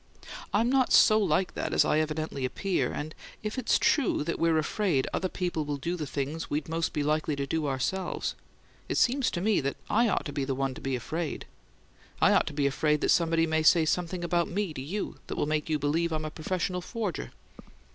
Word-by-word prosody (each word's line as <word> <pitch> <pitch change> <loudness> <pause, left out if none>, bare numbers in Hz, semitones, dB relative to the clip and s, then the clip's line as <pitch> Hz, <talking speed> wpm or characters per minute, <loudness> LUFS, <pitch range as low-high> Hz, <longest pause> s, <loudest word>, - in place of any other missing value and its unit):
I'm 225 +3 +2
not 260 0 +2
so 215 -1 +7
like 190 -2 +1
that - - -3
as - - +5
I 155 - +2
evidently 155 -3 -2
appear; 180 +9 -1
and 155 +1 -5 0.3
if 215 +4 -3
it's - - +2
true 300 - +2
that 170 - -3
we're 165 -1 +3
afraid 155 -2 +1
other 185 - -1
people 175 -4 -2
will 145 -1 -3
do 170 +6 -2
the 155 -4 -4
things 145 +4 -3
we'd 150 +1 -1
be 160 - -11
most 165 -1 -1
likely 150 +1 +1
to 140 0 -2
do 155 +2 -1
ourselves, 175 +8 -2 0.6
it - - 0
seems 260 +1 +3
to 175 - -3
me 210 -2 +2
that 140 0 -2
I 230 +1 +4
ought - - 0
to 145 - -5
be 140 - -1
the 135 0 -1
one 135 0 -1
to - - -10
be 135 -1 -1
afraid. 155 +6 -4 0.7
I - - +5
ought - - +3
to - - -4
be 145 -1 0
afraid 150 +2 +1
that - - +1
somebody 165 -1 +3
may 160 0 +1
say 160 +1 +5
something 175 +2 -1
about 175 0 +1
me 195 -2 -2
to 130 - -6
you 190 +10 -4
that - - -4
will - - 0
make 155 +1 -1
you 155 - +2
believe 160 +4 0
I'm 155 -1 -2
a 155 - -4
professional 180 +3 -2
forger." 210 -3 -4
160 Hz, 220 wpm, -28 LUFS, 150-185 Hz, 0.7 s, so